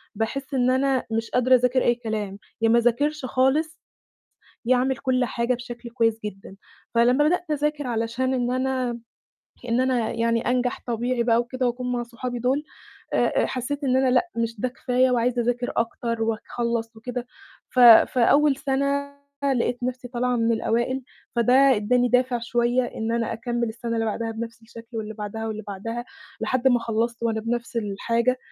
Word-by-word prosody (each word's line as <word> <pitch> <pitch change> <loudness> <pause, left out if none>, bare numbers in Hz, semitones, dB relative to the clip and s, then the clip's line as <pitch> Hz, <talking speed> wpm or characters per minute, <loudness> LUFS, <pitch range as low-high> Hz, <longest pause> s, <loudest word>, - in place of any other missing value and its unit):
باحس 265 +6 -3
إن 250 0 +3
أنا 265 0 +1
مش 225 0 -1
قادرة 255 +1 +4
أذاكر 250 +1 +2
أي 240 - +3
كلام، 215 -4 -4 0.2
يا 225 - +3
ما 235 - +5
أذاكرش 275 +5 +1
خالص، 275 +6 +1 0.9
يا 255 0 +4
أعمل 260 +1 +1
كل 255 -2 +1
حاجة 235 +1 0
بشكل 240 -1 -8
كويس 225 -2 +1
جدًا. 195 -1 -8 0.4
فلمّا 250 +5 +4
بدأت 355 -1 -1
أذاكر 295 -1 -1
علشان 235 +3 -1
إن 245 -1 0
أنا 255 -1 0
م 235 -1 -9 0.7
إن 235 +2 +2
أنا 250 -4 +1
يعني 230 0 +1
أنجح 250 0 0
طبيعي 240 +1 0
بقى 230 -1 +3
وكده 255 +1 -2
وأكون 250 +1 -2
مع 240 -1 -1
صحابي 245 +1 -5
دُول 265 +5 0 0.5
آآ - - +3 0.2
آآ - - +1
حسّيت 275 +3 -3
إن 255 -1 +2
أنا 260 -1 +3
لأ، 265 +8 +2
مش 230 -2 -2
ده 255 - 0
كفاية 255 0 +1
وعايزة 245 0 +1
أذاكر 245 +1 -1
أكتر 230 -1 -1
وأخلّص 235 0 -3
وكده 245 +2 -5 0.4
ف 255 - -5
فأول 255 +4 +6
سَنة 280 +1 -1 0.4
لقيت 245 +1 -1
نَفْسي 250 0 -4
طالعة 250 0 0
من 230 0 +2
الأوائل، 235 +4 0 0.3
فده 235 +1 +3 0.2
ادّاني 245 +4 +2
دافع 250 0 +2
شوية 240 +2 +1
إن 225 -1 -3
أنا 230 -1 -1
أكمّل 235 0 -2
السَنة 230 +1 -4
اللي 225 0 0
بعدها 225 +1 -2
بنَفْس 230 0 -7
الشكل 230 +1 -11
واللي 215 0 -5
بعدها 220 +1 -5
واللي 215 0 -5
بعدها، 230 +5 -5 0.4
لحد 255 +1 +2
ما 245 -1 +4
خلّصت 230 +1 -2
وأنا 220 -1 0
بنَفْس 235 +2 -3
الحاجة، 230 +4 0
240 Hz, 170 wpm, -24 LUFS, 230-255 Hz, 0.9 s, فأول